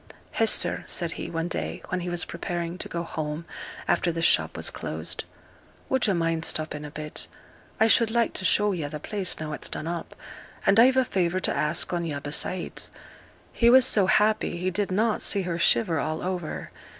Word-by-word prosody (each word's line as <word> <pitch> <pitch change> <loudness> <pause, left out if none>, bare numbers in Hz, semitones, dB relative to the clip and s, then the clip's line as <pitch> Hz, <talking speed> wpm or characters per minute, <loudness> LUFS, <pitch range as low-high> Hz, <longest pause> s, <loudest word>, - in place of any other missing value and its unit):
'Hester,' 225 -1 +2
said 170 -2 0
he, - - -5
one 165 0 -2
day 80 - -4
when 180 - -1
he 180 0 -4
was 175 0 0
preparing 170 0 -4
to - - -5
go 170 0 -3
home 155 -1 -4 0.4
after 175 0 +2
the 165 0 -3
shop - - +3
was - - -1
closed; - - -4 0.6
'would 265 -3 +2
yo' 200 - +2
mind 165 -1 0
stopping 155 -2 -1
a 150 - -6
bit? 150 +1 -5 0.5
I 220 - +6
should 225 0 +4
like 235 0 +1
to - - -2
show 210 +2 +3
yo' 160 -6 -3
the 150 0 -6
place 195 +3 -2
now 155 -1 -4
it's - - -5
done - - -4
up; 170 0 -5 0.5
and 200 +2 +5
I've 260 +3 +6
a 260 - +4
favour 185 -3 0
to - - 0
ask 150 +3 +1
on 175 -1 0
yo' 150 -4 -3
besides.' 150 +5 -1 0.6
He 235 - +4
was 255 +1 +7
so 205 -6 +3
happy 210 -3 +2
he 185 +2 -1
did 200 +2 -1
not 215 +3 +1
see 200 - +1
her 170 -1 -3
shiver 170 -3 +3
all 155 +1 -2
over. 180 -3 -4
175 Hz, 200 wpm, -26 LUFS, 160-205 Hz, 0.6 s, was